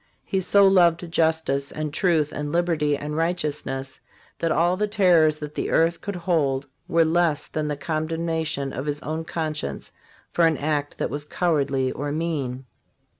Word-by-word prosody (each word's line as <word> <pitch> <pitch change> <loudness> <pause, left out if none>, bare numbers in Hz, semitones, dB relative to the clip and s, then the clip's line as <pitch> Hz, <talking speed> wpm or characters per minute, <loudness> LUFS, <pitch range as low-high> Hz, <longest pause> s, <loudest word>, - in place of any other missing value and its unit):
He 190 - 0
so 200 +2 +5
loved 175 -3 +3
justice 160 -4 +1
and 155 -1 -4
truth 160 -3 +2
and 145 0 -4
liberty 160 -4 +1
and 150 +1 -5
righteous 165 -2 -1
ness 135 0 -5 0.4
that 165 - 0
all 175 +3 +3
the 210 +2 0
terrors 175 -7 +4
that 150 -1 -7
the - - -2
earth 165 +1 +2
could 200 - -4
hold 155 -6 0 0.2
were 165 0 +3
less 165 -2 +1
than 155 -1 -3
the 150 -1 -2
condemnation 160 -3 -2
of 135 +3 -4
his 145 0 -2
own 160 +2 -3
conscience 155 - -4 0.4
for 170 -1 +4
an 160 -2 +1
act 145 -1 -2
that - - -2
was 145 0 -3
cowardly 140 -5 0
or 145 +1 -4
mean. 145 -5 -3
155 Hz, 170 wpm, -24 LUFS, 145-170 Hz, 0.4 s, so